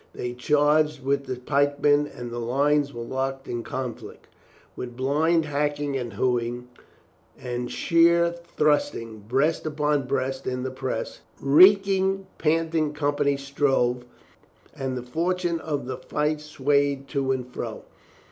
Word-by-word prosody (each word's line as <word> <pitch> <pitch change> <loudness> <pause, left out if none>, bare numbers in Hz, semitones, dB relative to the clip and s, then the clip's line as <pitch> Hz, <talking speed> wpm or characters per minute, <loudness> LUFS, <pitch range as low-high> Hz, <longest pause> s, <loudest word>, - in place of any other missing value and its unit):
They 120 0 -4
charged 150 +3 +2
with 140 +1 0
the 130 - -3
pikemen 145 +2 +2
and 120 -4 -8
the 120 - -4
lines 140 +4 +1
were 120 -2 -6
locked 135 +2 -3
in 120 -1 -3
con 125 0 -4
flict. - - -13 0.5
With 120 -1 -7
blind 155 +5 +2
hacking 145 -1 -1
and 120 -4 -3
hewing, 120 +2 -1 0.7
with 125 0 -4
sheer 170 0 +3
thrusting, 150 -9 -1
breast 150 +7 +1
upon 150 -3 0
breast 135 0 -2
in 125 0 -2
the 130 - -3
press, 130 0 -4 0.2
the - - -13
reek 195 +7 +7
ing, 195 0 +1
panting 160 -1 +1
companies 145 -1 0
strove, 135 -3 +1 0.7
and 130 -1 -3
the 125 - -5
fortune 170 +5 -1
of 145 -4 -3
the 130 0 -4
fight 150 +3 -1
swayed 140 -1 0
to 135 -2 0
and 130 -2 -1
fro. - - -5
140 Hz, 140 wpm, -25 LUFS, 130-150 Hz, 0.7 s, reek